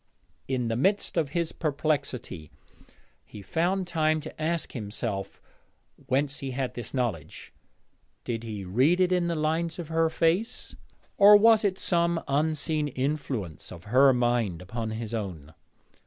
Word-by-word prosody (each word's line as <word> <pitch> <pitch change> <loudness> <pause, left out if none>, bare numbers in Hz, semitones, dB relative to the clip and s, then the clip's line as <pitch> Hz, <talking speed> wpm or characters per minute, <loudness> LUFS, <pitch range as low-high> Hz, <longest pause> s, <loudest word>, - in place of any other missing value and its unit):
In 125 -3 -1
the 115 - -1
midst 195 - +1
of 160 -5 +1
his 170 +2 -1
perplexity 140 - -2 0.7
he 105 - -12
found 180 - 0
time 155 -2 +1
to 155 - -9
ask 165 +1 -1
himself 105 -3 -4 0.7
whence 140 +2 0
he 135 - -4
had 130 0 -3
this 120 -3 -6
knowledge. 120 - -4 0.7
Did 115 -2 -3
he 105 -4 -6
read 130 - +3
it 185 0 +3
in 180 -1 +2
the 170 - -1
lines 160 +2 -1
of 170 -3 -6
her 165 0 +2
face, 175 +9 0 0.4
or 205 +1 +9
was 220 +1 +5
it 195 -2 +1
some 170 -2 +1
unseen 155 +1 0
influence 130 - -3
of 85 -1 -10
her 130 +6 +5
mind 120 -8 0
upon 110 +5 -5
his 110 0 -5
own? 90 -9 -5
140 Hz, 145 wpm, -27 LUFS, 115-165 Hz, 0.7 s, or